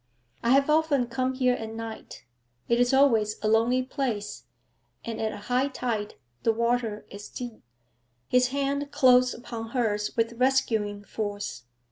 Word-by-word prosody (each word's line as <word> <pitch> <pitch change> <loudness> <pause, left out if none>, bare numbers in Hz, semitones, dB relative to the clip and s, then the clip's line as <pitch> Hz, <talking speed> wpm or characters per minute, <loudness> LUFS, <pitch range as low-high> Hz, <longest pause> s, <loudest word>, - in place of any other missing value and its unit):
I 235 - 0
have 275 +2 +5
often 300 -4 +3
come 255 +2 -2
here 255 -1 +3
at 225 -2 -5
night. 225 -1 -8 0.4
It 235 0 +2
is 245 0 +3
always 230 -6 +4
a - - +2
lonely 230 +4 +3
place, 235 -6 -3 0.6
and 230 -1 -4
at 220 -1 0
high 250 +5 +1
tide 230 -6 -3 0.3
the 225 - +3
water 235 -1 -1
is 205 +1 -9
deep.' 240 -3 -7 0.7
His 250 0 +3
hand 280 +2 -1
closed 255 -3 +4
upon 230 -2 -7
hers 210 -3 0
with 230 +1 0
rescuing 220 -6 +1
force. 205 - -5
240 Hz, 145 wpm, -27 LUFS, 220-255 Hz, 0.7 s, have